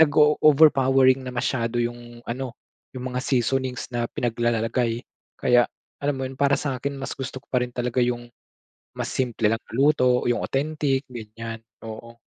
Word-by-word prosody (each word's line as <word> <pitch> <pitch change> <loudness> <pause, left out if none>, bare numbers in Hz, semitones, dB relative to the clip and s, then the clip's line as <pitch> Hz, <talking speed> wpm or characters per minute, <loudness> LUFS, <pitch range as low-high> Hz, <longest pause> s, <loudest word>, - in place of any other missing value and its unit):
nag-o-overpowering 145 -3 +5
na - - -3
masyado 120 -1 -1
yung 120 0 -6
ano, 125 0 -4 0.4
yung 130 0 -4
mga 125 - 0
seasonings 130 -1 0
na 120 -1 0
pinaglalalagay. 115 0 0 0.4
Kaya 120 -1 +4 0.4
alam 145 0 +1
mo 130 - -2
yun, 130 - -7
para 140 0 +4
sa'kin 140 0 -3
mas 135 - -4
gusto 130 0 -5
ko - - -34
pa 125 -1 +2
rin 125 - -8
talaga 125 0 0
yung 120 0 -1 0.7
mas - - -3
simple 120 -4 0
lang 115 +1 0
na - - -19
luto. 130 -3 +4
Yung 120 - +1
authentic 140 -1 0
ganyan, 115 -1 -7 0.2
oo. 115 +1 -9
125 Hz, 155 wpm, -24 LUFS, 120-135 Hz, 0.7 s, nag-o-overpowering